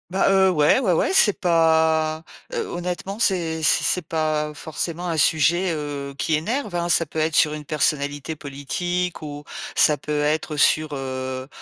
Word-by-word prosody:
Bah, 190 +2 +2
heu, 190 -1 +4
ouais 150 +5 +4
ouais 205 -8 +1
ouais, 170 - +1
c'est 210 - +4
pas, 160 -2 +2 0.3
heu, 460 -2 -2
honnêtement, 180 +3 -4
c'est 170 -7 0
c'est 155 - +3
c'est 180 -3 0
pas 155 -1 -1
forcément 170 +3 -4
un 165 - -1
sujet, 165 +4 +2
heu, 145 -2 -5
qui 155 - 0
énerve 215 - -2
hein? 175 0 -1
Ça 165 0 +3
peut 155 - -10
être 155 +1 0
sur 150 - +4
une 150 0 -6
personnalité 145 0 -1
politique 170 +6 -3
ou 145 -1 -8 0.3
ça 150 - +4
peut 150 +2 -3
être 155 0 -1
sur, 155 +1 +3
heu, 130 -1 -4
160 Hz, 170 wpm, -22 LUFS, 150-175 Hz, 0.3 s, heu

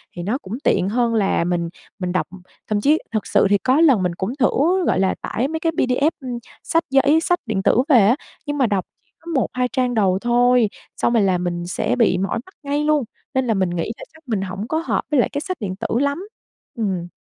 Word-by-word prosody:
thì 175 - -5
nó 215 +8 -1
cũng 195 -7 -9
tiện 185 - +2
hơn 235 +1 +1
là 200 -6 +2
mình 170 -1 -1 0.3
mình 180 -1 -2
đọc. 180 - 0 0.4
Thậm 210 -1 +1
chí 295 +7 +4
thực 215 -2 -2
sự - - +3
thì 205 - +4
có 260 +9 +2
lần 265 - +5
mình 180 -1 -1
cũng 195 +8 -3
thử, - - +4 0.4
gọi - - +2
là, 190 0 +2
tải 245 +4 -1
mấy 320 +2 -3
cái 330 0 0
PDF, 275 +1 +1
ưm, 250 -2 -4 0.3
sách 330 0 +1
giấy 280 +3 +4
sách 355 +1 +1
điện 210 -4 -2
tử 240 - +4
về 260 -5 +7
á, 235 - +4 0.3
nhưng 290 0 -3
mà 265 - +3
đọc 200 -3 -1 0.2
chỉ - - -41
có 340 +1 -8
1-2 250 -1 0
trang 250 0 0
đầu 195 -4 +2
thôi, 245 -1 +4 0.3
xong 235 - +1
rồi 225 -3 +4
là 190 -2 +2
mình 175 -1 -3
sẽ 180 - -1
bị 230 -7 +3
mỏi 195 +5 -1
mắt 375 - -18
ngay 290 +1 -1
luôn, 300 -2 +2 0.3
nên 260 -1 0
là 225 - +2
mình 190 -3 +1
nghĩ 175 +3 -2
là - - -10
chắc 320 - -19
mình 215 -5 -1
hổng 195 +3 -5
có 315 - -1
hợp - - 0
với 295 - +3
lại - - +3
cái 285 - -3
sách 370 +2 -4
điện 195 -5 -4
tử 195 - -4
lắm. 285 +8 -1 0.5
Ừm. 190 -6 -2
235 Hz, 245 wpm, -21 LUFS, 190-280 Hz, 0.5 s, về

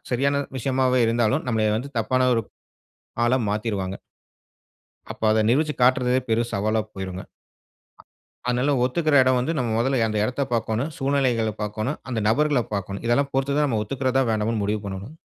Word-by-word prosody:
சரியான 140 +3 +1
விஷயமாவே 130 0 +1
இருந்தாலும், 120 +5 +1
நம்மளை 110 -2 +1
வந்து 140 +4 -7
தப்பான 130 +3 +2
ஒரு 115 - +1 0.8
ஆளா 125 +2 +3
மாத்திருவாங்க. 105 -3 -2 1.1
அப்ப - - -18
அத 110 0 +3
நிரூபுச்சு 150 +5 +2
காட்டுறதே 125 0 +3
பெரும் 115 +1 +1
சவாலா 110 +2 +1
போயிருங்க. 95 -1 -5 1.3
அதனால 125 +4 +1
ஒத்துக்கிற 155 +5 0
இடம் 130 0 +3
வந்து, 125 +6 -1
நம்ம 125 -3 -1
முதல்ல 130 +1 +1
அந்த 110 -1 -2
இடத்த 130 +5 -1
பார்க்கணும். 115 +6 -1
சூழ்நிலைகள 130 -5 +1
பார்க்கணும். 110 +7 -3
அந்த 120 - -1
நபர்கள 145 +1 +2
பார்க்கணும். 100 +1 -4
இதெல்லாம் 140 +4 +1
பொறுத்து 135 +1 0
தான் 150 - +3
நம்ம 110 -4 0
ஒத்துக்கிறதா? 130 +3 0
வேணாமான்னு 110 0 0
முடிவு 105 +1 -1
பண்ணணுங்க. 95 +7 -6
125 Hz, 150 wpm, -23 LUFS, 110-135 Hz, 1.3 s, ஆளா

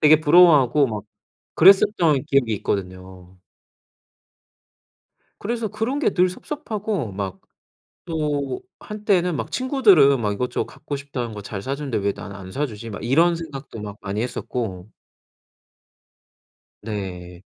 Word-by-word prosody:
되게 155 0 +6
부러워하고 150 -4 +6
막 105 -2 -5 0.5
그랬었던 175 - +5
기억이 135 -6 +1
있거든요. 95 -2 -5 2.0
그래서 230 +1 -2
그런 245 +8 -2
게 - - +1
늘 180 -1 +3
섭섭하고 210 - -4
막 95 -1 -5 0.7
또 145 -5 -2 0.2
한때는 200 -5 0
막 - - -4
'친구들은 200 - +4
막 105 -2 0
이것저것 125 +5 -2
갖고 145 - -7
싶다는 130 -5 -5
거 105 - -7
잘 100 -1 -6
사주는데 135 -1 -3
왜 100 -1 0
나는 100 -1 -9
안 95 -1 -10
사주지?' 115 -5 -4
막 100 - -7
이런 165 +8 +3
생각도 140 -8 -8
막 105 -1 -7
많이 100 +2 -3
했었고 110 -6 -4 1.9
네. 95 -4 -6
135 Hz, 260 characters per minute, -22 LUFS, 105-170 Hz, 2.0 s, 되게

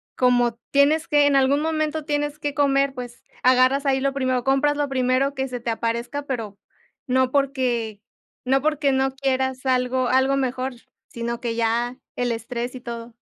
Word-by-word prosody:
como 245 -2 +2
tienes 300 +3 +3
que, 290 -1 +4
en 280 - +3
algún 275 +2 +3
momento 310 -1 -1
tienes 295 0 -2
que 290 -2 -3
comer, 275 -1 +2
pues, 245 -2 -8 0.2
agarras 255 +2 +4
ahí 265 -1 +2
lo 275 0 0
primero, 255 -2 0
compras 290 +2 +2
lo 290 -1 0
primero 260 +1 +1
que 265 0 -2
se 245 -1 -4
te 235 0 -2
aparezca, 235 +5 -2
pero 225 -7 -4 0.5
no 260 -1 +1
porque 250 -6 0 0.4
no 270 +1 +2
porque 300 -1 +1
no 265 0 +1
quieras 265 -1 -1
algo 255 0 +1
algo 265 +2 +3
mejor, 260 0 -2 0.4
sino 235 0 -4
que 235 -2 -2
ya 235 +2 0 0.2
el 245 -1 -1
estrés 240 +2 -4
y 255 - -6
todo. 235 -1 -7
260 Hz, 170 wpm, -23 LUFS, 245-275 Hz, 0.5 s, que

